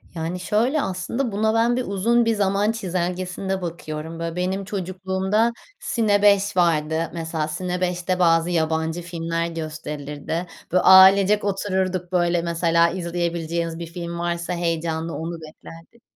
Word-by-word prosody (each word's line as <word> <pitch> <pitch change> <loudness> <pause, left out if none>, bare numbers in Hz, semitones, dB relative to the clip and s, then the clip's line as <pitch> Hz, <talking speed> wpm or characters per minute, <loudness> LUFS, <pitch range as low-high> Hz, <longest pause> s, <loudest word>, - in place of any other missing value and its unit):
Yani, 165 +3 -3
şöyle, 235 +10 +1
aslında, 220 +7 -2
buna 220 +2 +1
ben 230 +2 +3
bir 255 - -1
uzun 230 +5 +2
bir 225 0 +2
zaman 200 +1 +1
çizelgesinde 185 -1 -3
bakıyorum. 165 -1 -6
Böyle, 165 0 -4
benim 190 +2 -2
çocukluğumda 190 +3 -1 0.3
Cine5 205 -3 +2
vardı. 160 -1 +1
Mesela 160 -2 -2
Cine5'te 180 +2 -2
bazı 165 -1 +3
yabancı 160 0 0
filmler 165 -1 -3
gösterilirdi. 155 0 -5 0.2
Böyle, 180 - +3
ailecek 190 +2 +7
otururduk, 190 -2 -1
böyle, 175 -1 +2
mesela, 170 0 +2
izleyebileceğiniz 170 -1 -3
bir 170 - -5
film 170 0 -6
varsa 170 0 -2
heyecanla 165 -1 -2
onu 165 +1 -5
beklerdik. 165 +7 -13
175 Hz, 125 wpm, -23 LUFS, 165-195 Hz, 0.3 s, ailecek